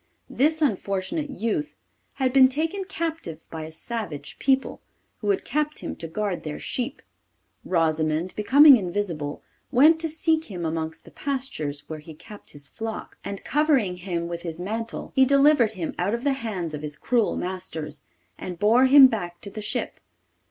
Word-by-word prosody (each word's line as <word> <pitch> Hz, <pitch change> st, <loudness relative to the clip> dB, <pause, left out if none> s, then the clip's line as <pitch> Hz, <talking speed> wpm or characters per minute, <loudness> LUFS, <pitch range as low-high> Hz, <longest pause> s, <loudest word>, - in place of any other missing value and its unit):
This 310 Hz, +3 st, +2 dB
unfortunate 230 Hz, -, -1 dB
youth 270 Hz, +3 st, -2 dB, 0.4 s
had 260 Hz, -2 st, 0 dB
been 265 Hz, -1 st, +8 dB
taken 325 Hz, +8 st, -2 dB
captive 325 Hz, -, -4 dB
by 160 Hz, -1 st, -5 dB
a 160 Hz, -, -9 dB
savage 160 Hz, -5 st, -5 dB
people, 270 Hz, -1 st, +1 dB, 0.4 s
who 205 Hz, -, -2 dB
had 200 Hz, -, +1 dB
kept 300 Hz, 0 st, -1 dB
him -, -, -5 dB
to 165 Hz, -, -6 dB
guard 195 Hz, +2 st, -2 dB
their 155 Hz, -1 st, -5 dB
sheep. 255 Hz, +3 st, -4 dB, 0.6 s
Rosimond, 160 Hz, 0 st, 0 dB
becoming 275 Hz, +6 st, +8 dB
invisible, 175 Hz, -7 st, -3 dB, 0.3 s
went 310 Hz, +6 st, +6 dB
to 325 Hz, 0 st, -1 dB
seek 320 Hz, +1 st, +1 dB
him 180 Hz, -5 st, -5 dB
amongst 160 Hz, 0 st, -4 dB
the -, -, -14 dB
pastures, 255 Hz, -, -4 dB
where 155 Hz, -1 st, -6 dB
he 155 Hz, +1 st, -11 dB
kept 210 Hz, +5 st, -12 dB
his 145 Hz, -1 st, -7 dB
flock, 225 Hz, +5 st, -7 dB
and, 200 Hz, -1 st, -6 dB
covering 270 Hz, -, +2 dB
him 175 Hz, -2 st, -3 dB
with 170 Hz, 0 st, -5 dB
his 165 Hz, -1 st, -5 dB
mantle, 225 Hz, +5 st, -4 dB
he 265 Hz, -, +6 dB
delivered 275 Hz, -4 st, +4 dB
him 175 Hz, -5 st, -4 dB
out 195 Hz, +5 st, +1 dB
of 235 Hz, -, -6 dB
the 285 Hz, -1 st, +2 dB
hands 200 Hz, -, -4 dB
of 150 Hz, -, -5 dB
his 150 Hz, -1 st, -6 dB
cruel 235 Hz, -4 st, +1 dB
masters, 165 Hz, -5 st, -5 dB, 0.4 s
and 180 Hz, -1 st, -6 dB
bore 230 Hz, +7 st, +5 dB
him 275 Hz, 0 st, +9 dB
back 175 Hz, -8 st, -1 dB
to 200 Hz, -, -8 dB
the 215 Hz, -, -6 dB
ship. 210 Hz, -, -2 dB
210 Hz, 170 wpm, -25 LUFS, 170-270 Hz, 0.6 s, him